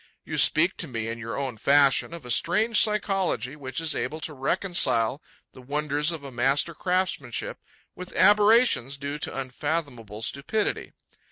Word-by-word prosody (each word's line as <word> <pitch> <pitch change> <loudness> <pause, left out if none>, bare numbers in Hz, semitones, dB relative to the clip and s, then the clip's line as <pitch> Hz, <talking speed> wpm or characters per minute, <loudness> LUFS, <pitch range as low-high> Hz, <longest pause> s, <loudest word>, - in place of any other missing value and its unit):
You - - -3
speak 170 +5 +4
to 170 - 0
me, 115 -4 -4
in 115 0 -5
your 115 0 -6
own 135 -4 -4
fashion, 140 +4 +3
of 170 -5 -9
a 125 - -4
strange 210 - +2
psychology 195 - 0
which 135 -1 -6
is 165 -2 +1
able 155 - -3
to 155 -1 -3
reconcile 140 - +1 0.3
the 130 - -14
wonders 150 +3 0
of 160 -4 -5
a 140 - -8
master 135 +6 +1
craftsmanship 185 - -2 0.3
with 180 0 -9
aberrations 210 - +4
due 140 +1 -5
to 135 - -3
unfathomable 130 -5 -4
stupidity. 170 - -2
145 Hz, 155 wpm, -25 LUFS, 130-180 Hz, 0.3 s, speak